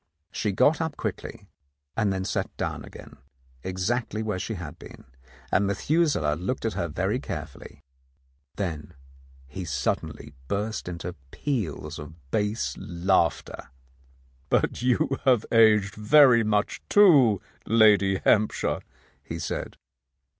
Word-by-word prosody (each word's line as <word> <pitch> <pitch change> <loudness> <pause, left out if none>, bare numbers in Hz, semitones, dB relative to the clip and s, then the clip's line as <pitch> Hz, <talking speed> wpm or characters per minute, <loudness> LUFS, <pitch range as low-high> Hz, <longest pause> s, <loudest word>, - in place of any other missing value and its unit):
She 105 - -1
got 150 - +3
up 160 -2 -3
quickly, - - -5 0.5
and 105 -3 +1
then 95 -1 -2
sat - - -2
down - - -3
again - - -12 0.4
exactly 105 - -2
where 105 -4 -2
she 110 +4 -4
had 85 -5 -8
been, - - -12 0.5
and 100 +2 +2
Methuselah 100 - +1
looked 105 +9 -3
at 115 - 0
her 85 - -2
very 75 - -1
carefully. - - -8 0.7
Then 85 -4 -4 0.5
he 75 +8 -7
suddenly 75 -1 -3
burst 105 +1 -3
into 90 0 -5 0.2
peals 85 - -3
of 75 +1 -9 0.2
bass 105 +1 -1
laughter. 85 -4 -1 0.8
"But - - +1
you 125 +2 +1
have 125 -5 +3
aged 105 -4 +5
very 120 +2 +6
much, 105 -1 0
too, 140 - +6 0.3
Lady 105 -3 +5
Hamp 110 0 +4
shire," - - -2 0.4
he - - -6
said. - - -5
105 Hz, 125 wpm, -26 LUFS, 90-115 Hz, 0.8 s, very